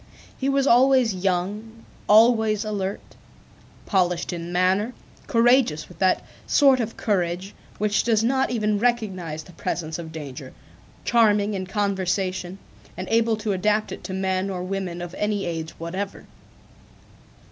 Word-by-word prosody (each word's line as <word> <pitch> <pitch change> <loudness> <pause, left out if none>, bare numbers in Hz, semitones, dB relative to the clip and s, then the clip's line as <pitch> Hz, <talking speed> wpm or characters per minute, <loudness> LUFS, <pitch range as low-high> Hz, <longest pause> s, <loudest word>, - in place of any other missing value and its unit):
He 270 - -1
was 275 -1 +2
always 255 -3 +5
young, 195 +5 -3 0.2
always 220 -1 +5
alert, 200 -2 -3 0.8
polished 180 -2 0
in 170 0 -5
manner, 190 +6 +1 0.3
courageous 240 - +3
with 180 - -16
that 185 -1 +2 0.2
sort 275 -2 +5
of 225 -1 -3
courage 185 -2 -1 0.2
which 210 0 +1
does 225 -2 +2
not 265 +3 +2
even 215 -3 0
recognize 190 -10 -1
the 180 - -15
presence 160 -1 -4
of 160 -2 -7
danger, 140 -4 -8 0.5
charming 210 -3 +3
in 185 -2 -4
conversation, 190 -2 -1 0.4
and 185 +1 -5
able 225 -1 +2
to 215 -1 -2
adapt 210 +3 0
it - - -7
to 190 - -5
men 190 0 -1
or 180 -2 -4
women 185 -2 -4
of 175 0 -8
any 210 -1 0
age 165 -2 -3
whatever. 185 +4 -5
200 Hz, 135 wpm, -24 LUFS, 180-225 Hz, 0.8 s, always